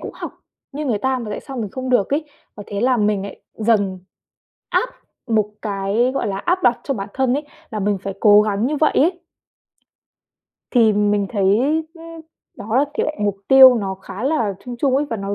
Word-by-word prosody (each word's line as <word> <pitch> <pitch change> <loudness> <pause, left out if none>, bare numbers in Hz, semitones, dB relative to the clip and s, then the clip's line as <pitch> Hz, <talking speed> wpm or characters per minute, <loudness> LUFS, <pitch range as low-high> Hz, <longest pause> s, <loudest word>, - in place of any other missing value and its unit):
cũng - - -7
học - - -6 0.4
như 295 +1 -4
người 220 -5 0
ta 260 +3 0
mà 220 -3 -6
tại - - -4
sao 270 -2 -9
mình 215 -5 -4
không 260 0 -5
được 205 -6 +2
ấy 300 +2 0 0.3
và 205 - -7
thế 200 0 -4
là 250 +1 +3
mình 210 -2 +1
nại 200 - -9
dần 205 -4 0 0.7
áp - - +1 0.4
một 215 -2 +1
cái, 205 +4 0
gọi - - -1
là, 195 - -3
áp 360 - 0
đặt 240 0 +3
cho 275 - -1
bản 195 -4 -5
thân 265 -1 +1
ấy 290 +1 -3 0.2
là 215 -2 -4
mình 200 0 0
phải 195 0 -6
cố 210 -1 +7
gắng 210 +2 0
như 300 +2 -1
vậy 305 +1 +2
ấy. 350 +4 +2 1.5
Thì 225 -4 +4
mình 205 -1 +1
thấy 200 -4 -1 0.5
ưm, 330 -1 -11 0.4
đó, 230 +7 +1
tỉ - - 0
lệ 305 - -3
mục 205 -1 0
tiêu 265 -1 +9
nó 195 -4 -2
khá 190 +2 -9
là 235 -10 0
chung 245 -1 -6
chung 270 -1 +2
ấy 290 - +1
và 225 - -1
nó 200 0 -4
225 Hz, 210 wpm, -20 LUFS, 205-265 Hz, 1.5 s, tiêu